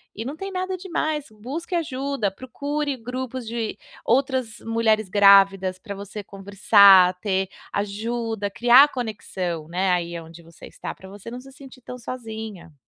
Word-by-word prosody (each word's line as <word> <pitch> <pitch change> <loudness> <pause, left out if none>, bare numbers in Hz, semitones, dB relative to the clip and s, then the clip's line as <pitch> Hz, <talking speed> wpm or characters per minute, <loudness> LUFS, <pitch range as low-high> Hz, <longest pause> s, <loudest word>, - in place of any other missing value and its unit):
e 225 - -5
não 280 +4 -5
tem 390 +4 -6
nada 370 0 -2
demais. 315 -5 -2
Busque 275 - -6
ajuda, 275 - -1
procure 285 +4 -4
grupos 250 0 -5
de 230 -1 -3 0.3
outras 255 -2 0
mulheres 220 -3 +1
grávidas 195 -2 +5
pra 200 0 -7
você 205 +1 -8
conversar, 195 -1 +5
ter 190 -1 -1 0.2
ajuda, 220 +1 -3
criar 245 +7 +6
conexão, 190 - -4
né, 185 +2 0
aí 170 -1 -1
aonde 165 +1 -11
você 165 0 -14
está - - -7
pra 190 - -14
você 205 +3 -10
não 245 - -6
se 270 +1 -14
sentir 270 -2 -14
tão 250 +1 -8
sozinha. 220 -8 -8
220 Hz, 150 wpm, -23 LUFS, 195-260 Hz, 0.3 s, criar